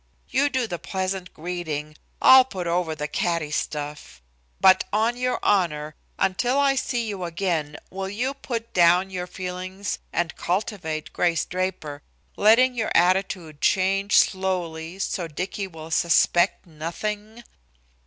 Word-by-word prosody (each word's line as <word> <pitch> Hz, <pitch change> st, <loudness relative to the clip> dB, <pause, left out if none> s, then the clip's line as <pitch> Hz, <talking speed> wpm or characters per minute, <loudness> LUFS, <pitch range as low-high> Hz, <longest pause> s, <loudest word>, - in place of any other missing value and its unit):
You 280 Hz, +2 st, +2 dB
do 260 Hz, -3 st, 0 dB
the 175 Hz, -6 st, -5 dB
pleasant 190 Hz, -1 st, -3 dB
greeting, 155 Hz, -3 st, -5 dB, 0.3 s
I'll 260 Hz, 0 st, +9 dB
put 190 Hz, -9 st, -6 dB
over 170 Hz, -2 st, 0 dB
the 150 Hz, 0 st, -3 dB
catty 165 Hz, -1 st, -1 dB
stuff. 145 Hz, -, -4 dB, 0.4 s
But 190 Hz, 0 st, +6 dB
on 220 Hz, +3 st, +1 dB
your 250 Hz, 0 st, -1 dB
honor, 155 Hz, -6 st, +1 dB, 0.2 s
until 245 Hz, +8 st, +1 dB
I 280 Hz, -1 st, +4 dB
see 245 Hz, -3 st, -1 dB
you 200 Hz, -4 st, -4 dB
again, 165 Hz, -4 st, -2 dB
will 190 Hz, 0 st, -4 dB
you 245 Hz, +7 st, -2 dB
put 235 Hz, -4 st, -5 dB
down 180 Hz, +2 st, +4 dB
your 180 Hz, -1 st, -4 dB
feelings 185 Hz, +2 st, -5 dB
and 170 Hz, -2 st, -1 dB
cultivate 170 Hz, -5 st, -3 dB
Grace 170 Hz, -3 st, +1 dB
Draper, 180 Hz, -5 st, -3 dB, 0.3 s
letting 235 Hz, +5 st, +5 dB
your 225 Hz, -3 st, -2 dB
attitude 175 Hz, -3 st, +1 dB
change 195 Hz, +1 st, +2 dB
slowly, 180 Hz, -3 st, 0 dB
so 195 Hz, -2 st, -2 dB
Dicky 185 Hz, +5 st, -4 dB
will 160 Hz, -2 st, -10 dB
suspect 175 Hz, +3 st, +3 dB
nothing?" 210 Hz, +8 st, -5 dB
185 Hz, 135 wpm, -24 LUFS, 165-205 Hz, 0.4 s, I'll